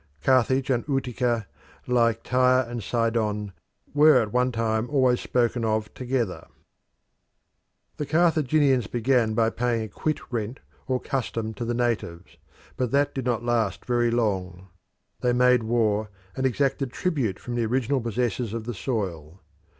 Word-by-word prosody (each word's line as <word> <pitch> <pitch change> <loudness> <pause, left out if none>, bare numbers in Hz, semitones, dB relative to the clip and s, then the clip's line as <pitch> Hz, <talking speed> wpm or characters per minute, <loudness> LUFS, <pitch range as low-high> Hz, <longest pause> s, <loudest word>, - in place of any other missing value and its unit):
Carthage 130 +1 +3
and 120 -2 +1
Utica, 125 -4 -1 0.4
like 115 -2 +2
Tyre 130 0 +3
and 120 -1 -5
Sidon, 110 -2 -1 0.4
were 150 +1 +6
at 105 -2 -2
one 125 +1 +2
time 115 0 -1
always 130 -4 +3
spoken 120 -1 0
of 110 -1 -1
together. 125 -6 -2 1.5
The 150 - -3
Carthaginians 150 - +3
began 120 -2 +1
by 115 0 +2
paying 120 -1 -1
a - - -5
quit 155 +8 -2
rent 115 +2 -3 0.3
or 130 -2 0
custom 115 -5 -3
to 120 - -5
the 120 +1 -1
natives, 110 -8 -2 0.4
but 125 -2 0
that 145 +2 +1
did 135 -3 -4
not 120 -2 -1
last 115 -5 0
very 120 -1 +2
long; 95 -5 -2 0.5
they 125 -1 +1
made 125 0 +4
war, 110 -2 0 0.3
and 130 0 +1
exacted 135 0 0
tribute 135 - -1
from 120 - -7
the 120 -2 0
original 130 +3 0
possessors 115 -1 -2
of 115 - -4
the 120 +2 -4
soil. 95 - -4
120 Hz, 145 wpm, -25 LUFS, 110-130 Hz, 1.5 s, were